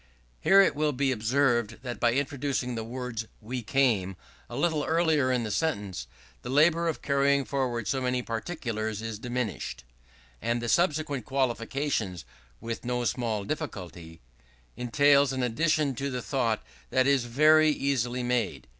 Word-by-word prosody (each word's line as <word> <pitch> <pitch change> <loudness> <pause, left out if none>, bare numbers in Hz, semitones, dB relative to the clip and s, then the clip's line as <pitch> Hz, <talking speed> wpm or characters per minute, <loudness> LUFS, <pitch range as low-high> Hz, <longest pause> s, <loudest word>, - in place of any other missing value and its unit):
Here 195 - +6
it 195 - +3
will 150 0 +1
be 135 +1 +1
observed 120 -1 +1
that 120 -2 -5
by 120 -1 +3
introducing 140 -2 -1
the 115 -1 -3
words 120 -1 -5
"we 125 +3 -5
came" 110 -6 +1 0.3
a 120 - -7
little 150 +1 +1
earlier 160 -5 +2
in 125 -2 +1
the 110 - -3
sentence, 100 - -2 0.3
the - - -7
labour 160 +5 +4
of 160 - -3
carrying 140 0 +2
forward 125 -5 -2
so 135 - 0
many 125 -1 0
particulars 115 - -4
is 110 -2 -5
diminished, 115 - -4 0.6
and 120 +1 0
the 120 0 -3
subsequent 150 - +1
qualification 130 -5 -1 0.4
"with 115 0 -5
no 125 0 -1
small 115 -4 -1
difficulty" 90 - -6 0.5
entails 140 +3 +4
an 130 -1 -1
addition 150 +3 +1
to 140 +3 -3
the 125 -2 -4
thought 115 -6 0 0.3
that 130 -1 +2
is 140 -3 +3
very 155 +5 +5
easily 125 -4 0
made. 125 -1 -1
125 Hz, 150 wpm, -28 LUFS, 115-140 Hz, 0.6 s, Here